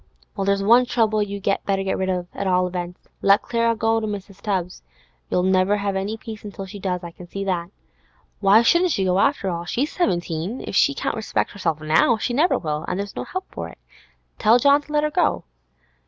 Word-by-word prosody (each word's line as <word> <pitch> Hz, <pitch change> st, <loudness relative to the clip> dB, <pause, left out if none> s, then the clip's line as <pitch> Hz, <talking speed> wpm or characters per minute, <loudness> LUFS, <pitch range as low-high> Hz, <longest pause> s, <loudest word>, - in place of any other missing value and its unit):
'Well, 195 Hz, -2 st, -2 dB
there's 200 Hz, 0 st, +1 dB
one 240 Hz, +4 st, +5 dB
trouble 220 Hz, -3 st, +1 dB
you'd 200 Hz, -1 st, -4 dB, 0.2 s
better 195 Hz, -1 st, +1 dB
get 190 Hz, -, -1 dB
rid 190 Hz, 0 st, -2 dB
of, 180 Hz, -1 st, -2 dB
at 195 Hz, -, -3 dB
all 180 Hz, 0 st, +3 dB
events. 180 Hz, 0 st, -6 dB
Let 200 Hz, +1 st, +4 dB
Clara 230 Hz, -1 st, +1 dB
go 225 Hz, 0 st, +1 dB
to 220 Hz, -, -3 dB
Mrs. 200 Hz, -1 st, -7 dB
Tubbs. 185 Hz, -4 st, -2 dB, 0.5 s
You'll 180 Hz, -, +1 dB
never 190 Hz, +2 st, +3 dB
have 200 Hz, -1 st, -2 dB
any 200 Hz, +3 st, -2 dB
peace 220 Hz, -1 st, -9 dB
till 195 Hz, 0 st, -7 dB
she 200 Hz, +2 st, -9 dB
does, 180 Hz, -2 st, -2 dB
I 170 Hz, -, -7 dB
can 175 Hz, +1 st, -13 dB
see 195 Hz, +3 st, -5 dB
that. 180 Hz, -3 st, -2 dB, 0.7 s
Why 205 Hz, +3 st, +5 dB
shouldn't 345 Hz, +9 st, +4 dB
she 195 Hz, -, 0 dB
go, 185 Hz, +1 st, +2 dB
after 280 Hz, -5 st, +1 dB
all? 170 Hz, 0 st, -4 dB
She's 265 Hz, -, -1 dB
seventeen; 175 Hz, -, -2 dB
if -, -, -5 dB
she 280 Hz, -, +4 dB
can't -, -, -2 dB
respect 220 Hz, -1 st, -2 dB
herself 165 Hz, -6 st, -2 dB
now, 160 Hz, +9 st, +3 dB
she 240 Hz, +3 st, -2 dB
never 310 Hz, +8 st, +3 dB
will, 150 Hz, -1 st, -3 dB
and 180 Hz, -, -2 dB
there's 200 Hz, 0 st, -5 dB
no -, -, -4 dB
help 375 Hz, 0 st, -5 dB
for -, -, -6 dB
it. -, -, -14 dB, 0.6 s
Tell 225 Hz, +2 st, +5 dB
John 280 Hz, +3 st, +4 dB
to 295 Hz, -, -14 dB
let 300 Hz, 0 st, +2 dB
her 300 Hz, -, 0 dB
go. -, -, +1 dB
200 Hz, 220 wpm, -22 LUFS, 185-230 Hz, 0.7 s, one